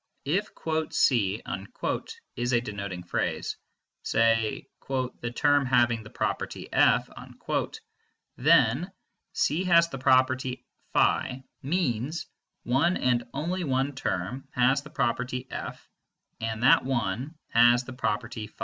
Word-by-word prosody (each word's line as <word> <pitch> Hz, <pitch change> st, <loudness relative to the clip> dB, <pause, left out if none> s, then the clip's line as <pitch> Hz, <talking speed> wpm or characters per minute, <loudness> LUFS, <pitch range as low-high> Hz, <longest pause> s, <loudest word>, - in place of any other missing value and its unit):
If 190 Hz, +9 st, 0 dB, 0.4 s
"C" 110 Hz, -5 st, +2 dB, 0.9 s
is 120 Hz, +1 st, -1 dB
a 120 Hz, -, +5 dB
denoting 100 Hz, -5 st, -5 dB
phrase, 85 Hz, -, -2 dB, 0.5 s
say 115 Hz, -1 st, +1 dB, 0.2 s
"the 130 Hz, -3 st, -2 dB
term 145 Hz, -1 st, +3 dB
having 120 Hz, -2 st, +3 dB
the 105 Hz, -, -12 dB
property -, -, -3 dB
F," -, -, +4 dB, 1.3 s
then 145 Hz, -, +3 dB, 0.4 s
"C 160 Hz, +5 st, +1 dB
has 170 Hz, -1 st, +5 dB
the 135 Hz, -, -6 dB
property 130 Hz, 0 st, +2 dB, 0.3 s
φ" 130 Hz, +1 st, +2 dB, 0.2 s
means 145 Hz, -1 st, -1 dB, 0.4 s
"one 140 Hz, +9 st, +2 dB
and 120 Hz, -1 st, +1 dB
only 175 Hz, +7 st, -2 dB
one 135 Hz, -1 st, 0 dB
term 125 Hz, 0 st, -3 dB
has 130 Hz, +2 st, +3 dB
the 150 Hz, -, -12 dB
property 125 Hz, -1 st, -1 dB
F, -, -, -6 dB, 0.5 s
and 110 Hz, 0 st, -3 dB
that 135 Hz, -, +6 dB
one 130 Hz, -, -2 dB
has 120 Hz, +2 st, +5 dB
the 130 Hz, -, -9 dB
property 115 Hz, -2 st, -3 dB
φ." -, -, -24 dB
125 Hz, 115 wpm, -27 LUFS, 115-140 Hz, 1.3 s, that